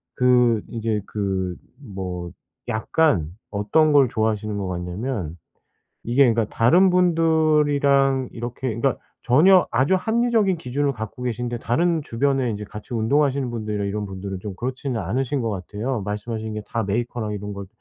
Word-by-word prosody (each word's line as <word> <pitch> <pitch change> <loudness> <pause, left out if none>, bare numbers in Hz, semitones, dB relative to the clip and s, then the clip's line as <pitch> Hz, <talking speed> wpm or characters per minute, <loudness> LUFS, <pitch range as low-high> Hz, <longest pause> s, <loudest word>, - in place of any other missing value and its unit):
그 125 -3 +4
이제 110 -2 -2
그 95 -3 -2 0.2
뭐 95 -8 -6 0.4
약간 110 - +1 0.2
어떤 110 +10 +2
걸 140 -4 +5
좋아하시는 110 -1 -1
거 100 -2 -3
같냐면 90 - -4 0.7
이게 120 +4 +3
그러니까 115 0 +1
다른 175 +12 +5
분들이랑 150 -6 +3
이렇게 120 +2 -5
그러니까 125 +3 0 0.2
전혀 180 +9 +5
아주 130 +10 +2
합리적인 220 -2 +1
기준을 140 0 -1
갖고 110 +1 -7
계신데 120 0 -3
다른 165 +8 +1
주변에 135 0 0
인제 105 -1 -4
같이 105 +5 -10
운동하시는 135 +3 +1
분들이나 105 -3 -3
이런 105 +1 -2
분들은 95 0 -6
좀 100 0 -6
그렇지는 130 0 -3
않으신 130 - -1
것 115 - -1
같아요, 105 +5 -3
말씀하신 110 +2 -4
게 105 - -4
다 115 - -2
메이커랑 110 +1 -2
이런 105 0 -5
걸 100 0 -7
120 Hz, 345 characters per minute, -23 LUFS, 105-140 Hz, 0.7 s, 걸